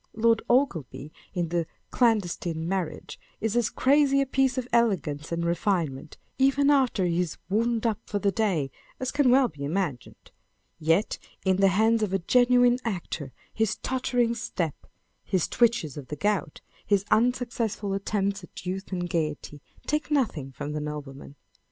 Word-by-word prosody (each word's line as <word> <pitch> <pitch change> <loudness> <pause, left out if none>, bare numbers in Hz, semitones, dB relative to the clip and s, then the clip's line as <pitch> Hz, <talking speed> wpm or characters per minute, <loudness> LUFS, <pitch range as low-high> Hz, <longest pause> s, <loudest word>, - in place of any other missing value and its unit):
Lord 225 +1 +3
Ogleby, 165 - 0 0.2
in 175 -2 -1
the 170 -1 -1 0.2
Clandestine 175 -8 +1
Marriage, 185 -3 -3 0.2
is 225 0 -1
as 240 -2 +2
crazy 275 0 +3
a 275 - +2
piece 265 -1 +1
of 250 -1 -2
elegance 180 -11 +1
and 170 0 -1
refinement, 170 -5 -1 0.2
even 275 +2 +4
after 260 -8 +2
lie 175 - +1
is 170 -1 -1
" - - -45
wound 230 +2 +1
up 220 -3 +1
for 205 - -2
the 200 0 +1
day," 180 - 0 0.3
as 260 0 -2
can 285 -3 +3
well 260 +1 +5
be 145 -9 -9
imagined; 155 -4 -4 0.5
yet 165 +6 +1 0.3
in 190 -1 +3
the 195 0 +5
hands 220 +4 +3
of 205 -3 -1
a - - +3
genuine 245 +5 +4
actor, 175 - -4 0.2
his 220 -1 0
tottering 245 -2 0
step, 170 -8 -4 0.4
his 185 -5 0
twitches 230 - +1
of 140 -3 -8
the 150 - -5
gout, 190 -1 -1 0.2
his 200 -1 +1
un 240 +3 +5
successful 230 -5 -3
attempts 200 0 -1
at 180 - -11
youth 190 +2 -4
and 175 -1 -2
gaiety, 150 -3 -3 0.2
take 300 +1 -1
nothing 215 - 0
from 145 +3 -6
the 150 0 -3
nobleman. 145 -2 -7
200 Hz, 165 wpm, -27 LUFS, 165-240 Hz, 0.5 s, well